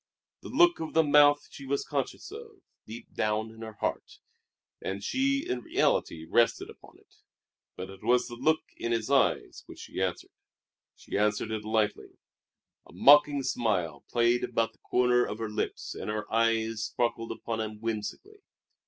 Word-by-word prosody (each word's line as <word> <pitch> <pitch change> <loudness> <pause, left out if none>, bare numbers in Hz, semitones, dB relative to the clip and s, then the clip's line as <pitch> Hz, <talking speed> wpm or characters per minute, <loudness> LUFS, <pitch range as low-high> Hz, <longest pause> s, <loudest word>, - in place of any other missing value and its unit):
The - - -9
look 345 +5 +4
of 160 -1 -6
the 160 - +6
mouth 145 0 +5
she 140 - -10
was 140 +1 -1
conscious 140 - -4
of, 440 -3 -11 0.2
deep 110 +2 -10
down 110 +1 -1
in 115 0 -14
her 110 -1 -7
heart, - - -4 0.6
and 100 +1 -4
she 275 +1 0
in 125 - -1
reality 80 -7 0
rested 120 +6 +2
upon - - -17
it; - - -27 0.6
but 95 +1 -7
it 95 - -13
was 125 0 +3
the 120 - -9
look 155 +6 +1 0.2
in 115 - -3
his 115 +3 -2
eyes 140 - +1
which - - -11
she - - -6
answered. - - -2 0.6
She - - -4
answered 105 +1 0
it 110 -1 -3
lightly. 110 -1 -1 0.7
A - - -17
mocking 145 0 +6
smile 90 - -1
played 120 0 +2
about 115 -1 0
the - - -31
corners 125 0 +2
of 105 - -5
her 110 -1 -4
lips 105 - -3
and - - -6
her 105 0 -2
eyes 115 -1 +1
sparkled 115 -1 -2
upon 115 -1 -4
him 110 -1 -5
whimsically. 115 - -5
115 Hz, 170 wpm, -29 LUFS, 110-145 Hz, 0.7 s, the